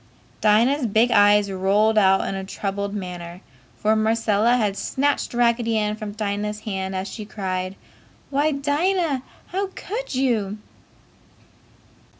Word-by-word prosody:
Dinah's 235 Hz, +6 st, +3 dB
big 225 Hz, +3 st, +3 dB
eyes 205 Hz, 0 st, +5 dB
rolled 200 Hz, +4 st, +2 dB
out 195 Hz, -2 st, +4 dB
in -, -, -2 dB
a 195 Hz, 0 st, -4 dB
troubled 200 Hz, +1 st, -4 dB
manner, 180 Hz, -2 st, -6 dB, 0.4 s
for 215 Hz, +1 st, +2 dB
Marcella 220 Hz, +1 st, +2 dB
had 210 Hz, -4 st, 0 dB
snatched 285 Hz, +6 st, -1 dB
Raggedy 235 Hz, -1 st, +2 dB
Ann 210 Hz, 0 st, 0 dB
from 215 Hz, -1 st, -6 dB
Dinah's 210 Hz, 0 st, -3 dB
hand 190 Hz, -3 st, -4 dB
as 190 Hz, +1 st, -3 dB
she 220 Hz, -, -7 dB
cried, 185 Hz, -2 st, -4 dB, 0.6 s
"Why, 290 Hz, +3 st, +2 dB
Dinah! 295 Hz, +1 st, 0 dB, 0.3 s
How 390 Hz, +2 st, -1 dB
could 455 Hz, -, -5 dB
you?" 225 Hz, -6 st, 0 dB
215 Hz, 130 wpm, -23 LUFS, 200-245 Hz, 0.6 s, eyes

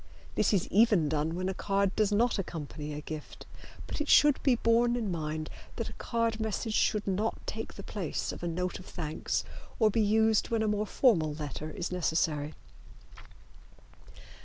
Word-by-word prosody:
This -, -, +2 dB
is 195 Hz, -5 st, +1 dB
even 205 Hz, -7 st, +4 dB
done 155 Hz, +2 st, 0 dB
when 185 Hz, +1 st, -2 dB
a 190 Hz, -, -1 dB
card 195 Hz, 0 st, 0 dB
does 215 Hz, -1 st, +2 dB
not 230 Hz, +2 st, +2 dB
accompany 150 Hz, -4 st, -5 dB
a 150 Hz, -, -5 dB
gift, 155 Hz, 0 st, -8 dB, 0.4 s
but -, -, -4 dB
it 300 Hz, -, -3 dB
should 295 Hz, -2 st, +6 dB
be 265 Hz, -3 st, +4 dB
borne 235 Hz, +1 st, +3 dB
in 220 Hz, -5 st, -2 dB
mind 155 Hz, -2 st, -3 dB, 0.3 s
that -, -, -3 dB
a -, -, -10 dB
card 230 Hz, -1 st, 0 dB
message 220 Hz, +1 st, -2 dB
should 210 Hz, -1 st, +2 dB
not 205 Hz, +3 st, 0 dB
take 225 Hz, 0 st, -5 dB
the 200 Hz, -, -8 dB
place 195 Hz, -6 st, -3 dB
of -, -, -8 dB
a 175 Hz, -, -2 dB
note 180 Hz, +2 st, -2 dB
of 185 Hz, -, -12 dB
thanks 155 Hz, -3 st, -2 dB, 0.3 s
or 215 Hz, -2 st, +4 dB
be 225 Hz, -, +2 dB
used 220 Hz, +1 st, +3 dB
when 225 Hz, -1 st, +1 dB
a -, -, +1 dB
more 210 Hz, 0 st, 0 dB
formal 165 Hz, -, +3 dB
letter 150 Hz, 0 st, -5 dB
is 175 Hz, +4 st, -4 dB
necessary. 160 Hz, -4 st, 0 dB
195 Hz, 180 wpm, -30 LUFS, 160-220 Hz, 0.4 s, should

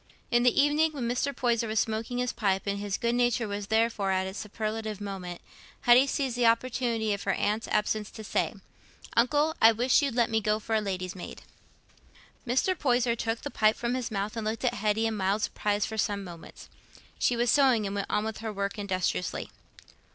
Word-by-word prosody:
In 240 Hz, 0 st, +4 dB
the 245 Hz, 0 st, +3 dB
evening, 300 Hz, +2 st, +3 dB
when 255 Hz, -5 st, -3 dB
Mr. 250 Hz, +4 st, 0 dB
Poyser 235 Hz, -3 st, 0 dB
was 215 Hz, 0 st, 0 dB
smoking 225 Hz, +2 st, -2 dB
his 250 Hz, 0 st, -1 dB
pipe, 195 Hz, -3 st, 0 dB
and 200 Hz, 0 st, -2 dB
his 200 Hz, -1 st, -2 dB
good 235 Hz, 0 st, 0 dB
nature 240 Hz, -1 st, +1 dB
was 205 Hz, 0 st, -4 dB
therefore 220 Hz, -2 st, +1 dB
at 190 Hz, 0 st, +1 dB
its 190 Hz, +2 st, -6 dB
superlative 215 Hz, 0 st, -4 dB
moment, 190 Hz, -4 st, -6 dB, 0.4 s
Hetty 245 Hz, +3 st, +6 dB
seized 265 Hz, -3 st, -1 dB
the 245 Hz, -1 st, +3 dB
opportunity 230 Hz, -2 st, +1 dB
of 200 Hz, -, -4 dB
her 195 Hz, -, 0 dB
aunt's 215 Hz, +4 st, -1 dB
absence 210 Hz, 0 st, 0 dB
to 220 Hz, -, -10 dB
say, -, -, -1 dB, 0.6 s
"Uncle, 290 Hz, +6 st, +3 dB
I 225 Hz, -, +9 dB
wish 245 Hz, +6 st, +3 dB
you'd 275 Hz, -5 st, -1 dB
let 235 Hz, -2 st, +2 dB
me 220 Hz, 0 st, +2 dB
go 210 Hz, 0 st, +1 dB
for 220 Hz, +1 st, -5 dB
a 220 Hz, -, +3 dB
lady's 185 Hz, -2 st, -4 dB
maid." 180 Hz, -, -9 dB, 1.0 s
Mr. 265 Hz, +10 st, +2 dB
Poyser 245 Hz, -6 st, +1 dB
took 225 Hz, 0 st, -2 dB
the 285 Hz, -, -5 dB
pipe 215 Hz, 0 st, +3 dB
from 240 Hz, 0 st, -2 dB
his 255 Hz, -2 st, -2 dB
mouth 205 Hz, +1 st, -3 dB
and 225 Hz, -, -3 dB
looked 220 Hz, +3 st, -2 dB
at 245 Hz, -, +2 dB
Hetty 215 Hz, 0 st, 0 dB
in 225 Hz, -1 st, 0 dB
mild 200 Hz, +1 st, 0 dB
surprise 205 Hz, 0 st, 0 dB
for 220 Hz, -1 st, -5 dB
some 200 Hz, -1 st, 0 dB
moments. 170 Hz, -3 st, -11 dB, 0.5 s
She 245 Hz, -, +2 dB
was 240 Hz, 0 st, +2 dB
sewing, 260 Hz, -7 st, +4 dB
and 195 Hz, -, -3 dB
went 200 Hz, -1 st, -3 dB
on 210 Hz, -, 0 dB
with 220 Hz, 0 st, -4 dB
her 220 Hz, 0 st, -4 dB
work 200 Hz, +1 st, -3 dB
industriously. 185 Hz, -2 st, -2 dB
220 Hz, 205 wpm, -28 LUFS, 205-240 Hz, 1.0 s, I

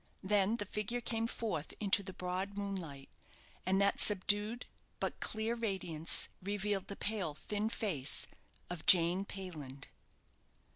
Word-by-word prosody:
Then 205 Hz, +3 st, +3 dB
the 205 Hz, -, -3 dB
figure 210 Hz, +4 st, -2 dB
came 230 Hz, -1 st, -1 dB
forth 215 Hz, -10 st, -3 dB
into 200 Hz, -1 st, +3 dB
the 195 Hz, -1 st, -7 dB
broad 185 Hz, +2 st, -3 dB
moonlight; 180 Hz, -9 st, -4 dB, 0.6 s
and 190 Hz, +1 st, +3 dB
that 200 Hz, 0 st, +3 dB
subdued, 210 Hz, +3 st, +4 dB, 0.3 s
but -, -, -2 dB
clear 220 Hz, +1 st, -1 dB
radiance, 190 Hz, -8 st, +1 dB
revealed 200 Hz, 0 st, -1 dB
the 200 Hz, -, -5 dB
pale, 195 Hz, -9 st, -1 dB
thin 210 Hz, +7 st, -2 dB
face 155 Hz, -, 0 dB, 0.4 s
of 175 Hz, -3 st, -6 dB
Jane 180 Hz, +2 st, +6 dB
Payland. 155 Hz, -9 st, -7 dB
200 Hz, 130 wpm, -35 LUFS, 180-210 Hz, 0.6 s, Jane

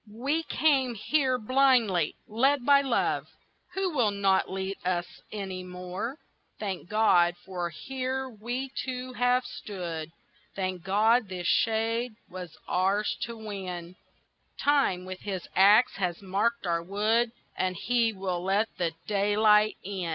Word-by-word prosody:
We 270 Hz, +9 st, -1 dB
came 275 Hz, -6 st, +2 dB
here 260 Hz, +3 st, +1 dB
blindly, 240 Hz, -, +3 dB
led 260 Hz, +4 st, +2 dB
by 280 Hz, -1 st, +6 dB
love, 265 Hz, -4 st, 0 dB, 0.5 s
Who 380 Hz, -3 st, 0 dB
will 245 Hz, -7 st, +3 dB
not 195 Hz, -2 st, +2 dB
lead 190 Hz, +1 st, -3 dB
us 180 Hz, -1 st, 0 dB, 0.3 s
any 190 Hz, -3 st, -5 dB
more. 180 Hz, +8 st, -5 dB, 0.4 s
Thank 190 Hz, -4 st, -4 dB
God 180 Hz, -5 st, +4 dB
that 175 Hz, -2 st, -3 dB
here 265 Hz, 0 st, -2 dB
we 245 Hz, +3 st, -4 dB
two 255 Hz, 0 st, -5 dB
have 245 Hz, +1 st, +2 dB
stood, 170 Hz, -6 st, -6 dB, 0.4 s
Thank 185 Hz, -2 st, -2 dB
God 215 Hz, +3 st, +3 dB
this 180 Hz, -2 st, -5 dB
shade 225 Hz, +3 st, +1 dB
was 180 Hz, -3 st, -9 dB
ours 195 Hz, +4 st, +1 dB
to 235 Hz, 0 st, -8 dB
win; 185 Hz, -5 st, -6 dB, 0.6 s
Time 275 Hz, -11 st, +2 dB
with 185 Hz, 0 st, -7 dB
his 190 Hz, -4 st, -5 dB
axe 205 Hz, +6 st, +6 dB
has 180 Hz, -3 st, -1 dB
marked 205 Hz, +4 st, -1 dB
our 170 Hz, -1 st, 0 dB
wood 215 Hz, +6 st, +1 dB, 0.2 s
And 185 Hz, 0 st, -1 dB
he 230 Hz, +4 st, +1 dB
will 190 Hz, -3 st, -3 dB
let 200 Hz, +4 st, +1 dB
the 170 Hz, -2 st, 0 dB
daylight 210 Hz, +1 st, +3 dB
in. 185 Hz, -3 st, -4 dB
210 Hz, 135 wpm, -28 LUFS, 185-245 Hz, 0.6 s, by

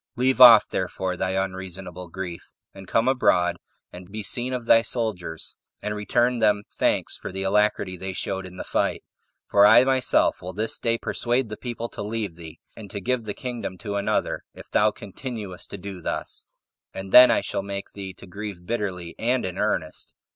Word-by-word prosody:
Leave 130 Hz, 0 st, +1 dB
off, 120 Hz, -2 st, +10 dB
therefore, 95 Hz, 0 st, -2 dB
thy 95 Hz, +1 st, -2 dB
unreasonable 95 Hz, -1 st, -4 dB
grief, 90 Hz, -1 st, -7 dB, 0.2 s
and 95 Hz, -1 st, -12 dB
come 115 Hz, +5 st, +1 dB
abroad 90 Hz, -9 st, +3 dB, 0.4 s
and 90 Hz, +1 st, -11 dB
be 110 Hz, 0 st, -5 dB
seen 120 Hz, +6 st, -1 dB
of 125 Hz, -2 st, -3 dB
thy 115 Hz, -1 st, +6 dB
soldiers, 105 Hz, -9 st, -2 dB, 0.2 s
and 105 Hz, -, -3 dB
return 120 Hz, +4 st, +1 dB
them 105 Hz, -2 st, +3 dB
thanks -, -, 0 dB
for -, -, -7 dB
the 95 Hz, +1 st, -4 dB
alacrity 100 Hz, -1 st, +1 dB
they 95 Hz, +1 st, -5 dB
showed 95 Hz, +1 st, -3 dB
in 90 Hz, 0 st, -11 dB
the -, -, -5 dB
fight; -, -, -1 dB, 0.4 s
for 100 Hz, -, +4 dB
I 110 Hz, +4 st, +8 dB
myself 130 Hz, -1 st, +2 dB
will 90 Hz, +1 st, -6 dB
this 110 Hz, +4 st, -1 dB
day 115 Hz, 0 st, +1 dB
persuade 120 Hz, +1 st, -1 dB
the 105 Hz, -, -5 dB
people 120 Hz, -1 st, -5 dB
to -, -, -7 dB
leave 105 Hz, -3 st, -3 dB
thee, 80 Hz, -2 st, -11 dB, 0.2 s
and 105 Hz, -3 st, -10 dB
to 105 Hz, -, -5 dB
give 120 Hz, +3 st, -1 dB
the 105 Hz, -, -4 dB
kingdom 120 Hz, -7 st, -5 dB
to 100 Hz, +1 st, -5 dB
another, 100 Hz, 0 st, -1 dB
if -, -, -13 dB
thou 105 Hz, -, +4 dB
continuest 105 Hz, -2 st, -7 dB
to -, -, -7 dB
do 95 Hz, -1 st, -8 dB
thus; -, -, -4 dB, 0.5 s
and 95 Hz, 0 st, -6 dB
then 125 Hz, 0 st, +10 dB
I -, -, +3 dB
shall -, -, -3 dB
make 100 Hz, 0 st, -6 dB
thee 95 Hz, -2 st, -7 dB
to -, -, -13 dB
grieve 95 Hz, -1 st, -7 dB
bitterly 95 Hz, -6 st, -3 dB
and 125 Hz, +1 st, +1 dB
in 95 Hz, 0 st, -5 dB
earnest." 85 Hz, -7 st, -2 dB
100 Hz, 190 wpm, -24 LUFS, 95-115 Hz, 0.5 s, off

